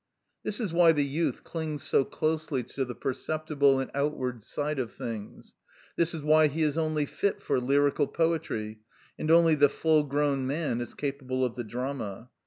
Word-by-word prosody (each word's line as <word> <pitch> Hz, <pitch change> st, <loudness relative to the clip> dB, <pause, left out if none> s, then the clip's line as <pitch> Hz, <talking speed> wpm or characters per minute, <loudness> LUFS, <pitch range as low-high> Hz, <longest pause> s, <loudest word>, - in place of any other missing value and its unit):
This 210 Hz, -, -4 dB
is 205 Hz, -8 st, -2 dB
why 170 Hz, -1 st, +6 dB
the 145 Hz, -2 st, +1 dB
youth 155 Hz, +5 st, -1 dB
clings 155 Hz, -4 st, -4 dB
so -, -, +3 dB
closely 155 Hz, -3 st, -1 dB
to 135 Hz, +3 st, -3 dB
the 125 Hz, -2 st, -6 dB
perceptible 140 Hz, +1 st, +1 dB
and 135 Hz, -, -3 dB
outward 135 Hz, -4 st, -2 dB
side 145 Hz, +6 st, -3 dB
of 120 Hz, -3 st, -2 dB
things; 115 Hz, -5 st, -7 dB, 0.4 s
this 170 Hz, 0 st, +1 dB
is 155 Hz, -, -6 dB
why 155 Hz, +1 st, +5 dB
he 155 Hz, +2 st, -1 dB
is 150 Hz, -1 st, +1 dB
only 155 Hz, -2 st, 0 dB
fit 200 Hz, +7 st, -1 dB
for -, -, +1 dB
lyrical 140 Hz, +3 st, +2 dB
poetry, 155 Hz, -10 st, -1 dB, 0.4 s
and 155 Hz, -, -2 dB
only 165 Hz, 0 st, +6 dB
the 145 Hz, -2 st, +5 dB
full 155 Hz, +1 st, +3 dB
grown 140 Hz, -2 st, 0 dB
man 140 Hz, -4 st, -1 dB
is 120 Hz, -, -7 dB
capable 130 Hz, -2 st, -2 dB
of 120 Hz, -, -3 dB
the 120 Hz, -, -4 dB
drama. 120 Hz, -2 st, -5 dB
145 Hz, 180 wpm, -28 LUFS, 130-155 Hz, 0.4 s, why